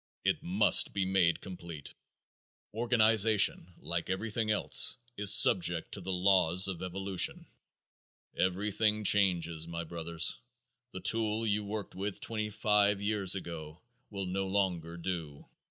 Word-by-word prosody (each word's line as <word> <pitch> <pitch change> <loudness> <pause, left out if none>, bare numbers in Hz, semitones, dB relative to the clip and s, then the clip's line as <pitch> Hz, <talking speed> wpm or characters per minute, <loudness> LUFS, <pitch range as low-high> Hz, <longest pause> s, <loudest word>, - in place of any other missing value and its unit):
It - - 0
must - - +3
be 100 -1 -1
made 95 -3 +1
complete. 85 -6 -10 0.8
Organization, 110 -5 +2
like 85 +3 -4
everything 110 +3 -3
else, 110 +3 +3 0.2
is 105 -1 +4
subject 90 -6 +5
to 100 - -2
the 95 +1 -5
laws 90 -1 +3
of 95 -3 -5
evolution. 95 +1 -1 0.9
Everything 105 +3 -1
changes, 85 -6 +1
my 85 0 -6
brothers. 85 0 -4 0.5
The 95 - -9
tool 110 0 0
you 105 -1 -1
worked 105 0 -7
with 100 +1 -5
twenty 110 -2 -4
five 105 -1 +1
years 100 -2 +3
ago 85 -2 -9 0.3
will 100 -2 -6
no 95 +1 -3
longer 90 -4 -2
do. 85 -5 -6
95 Hz, 125 wpm, -30 LUFS, 85-105 Hz, 0.9 s, subject